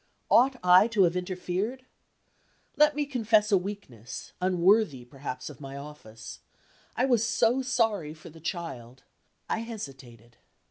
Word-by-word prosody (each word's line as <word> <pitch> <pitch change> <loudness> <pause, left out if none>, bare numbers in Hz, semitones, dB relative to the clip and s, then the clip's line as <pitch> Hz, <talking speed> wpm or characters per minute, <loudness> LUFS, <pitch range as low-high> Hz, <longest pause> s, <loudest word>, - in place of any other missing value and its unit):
Ought 260 +2 +5
I 180 +4 +7
to 215 -4 +3
have 175 0 +2
interfered? 185 +7 -3 0.9
Let 300 0 +4
me 295 0 0
confess 225 -5 +2
a - - +6
weakness, 180 - -6
unworthy 180 - +2
perhaps 130 0 -7
of 150 -2 -10
my 135 0 -7
office. 140 -6 -10 0.6
I 250 - +3
was 240 -4 +3
so 230 +3 +2
sorry 225 - 0
for 160 +1 -13
the 165 - -14
child 130 -8 -6 0.4
I - - -1
hesitated. 135 - -9
180 Hz, 135 wpm, -28 LUFS, 140-225 Hz, 0.9 s, I